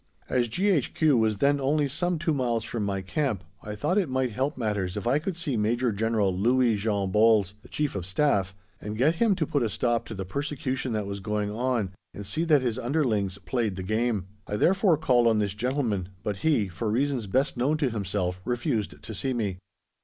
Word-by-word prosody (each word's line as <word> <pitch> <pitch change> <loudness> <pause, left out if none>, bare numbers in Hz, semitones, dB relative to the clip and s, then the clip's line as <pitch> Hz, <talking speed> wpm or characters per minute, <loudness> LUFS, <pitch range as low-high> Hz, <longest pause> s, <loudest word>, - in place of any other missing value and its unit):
As 125 -2 +1
G.H.Q. 155 - +2
was 110 -3 +2
then 140 +4 +2
only 145 +2 +2
some 170 +5 -1
two 160 0 0
miles 120 -5 0
from 115 - -4
my 100 -1 -2
Camp 110 - -1 0.2
I 105 0 -6
thought 155 - +1
it 180 -8 -1
might 130 -1 0
help 135 +7 -1
matters 105 -5 -1
if 105 - -4
I 130 +5 +3
could 175 +3 -3
see 160 -6 -2
Major 115 +3 +1
General 105 -2 +1
Louis 120 +3 +3
Jean 100 -2 -1
Bols, 105 -2 +4
the - - -17
Chief 150 -2 -1
of 90 -3 -4
Staff, 95 -4 +1 0.3
and 105 +1 -5
get 155 +7 +3
him 220 -4 +4
to 165 - 0
put 145 -1 0
a 115 - +1
stop 120 +2 0
to 110 - -6
the 95 -1 -4
persecution 135 - -2
that 105 -2 -1
was 100 0 -5
going 105 +1 -2
on, 115 -3 -1 0.2
and 100 - -7
see 160 +11 -1
that 150 -5 +4
his 120 -1 -1
underlings 115 - 0
"played 115 -6 -1
the 95 - -5
game." 110 -1 0 0.2
I 105 - -2
therefore 185 - +3
called 125 -6 +3
on 115 -1 +4
this 100 -2 0
gentleman, 110 -5 -1
but 105 -2 -2
he, 140 -6 +2
for 95 +5 -3
reasons 125 0 0
best 130 +8 +1
known 135 +5 +1
to 140 -5 0
himself, 95 -4 -2
refused 105 - -2
to 110 - -6
see 130 +5 -1
me. 100 -6 -2
115 Hz, 210 wpm, -27 LUFS, 105-140 Hz, 0.3 s, Bols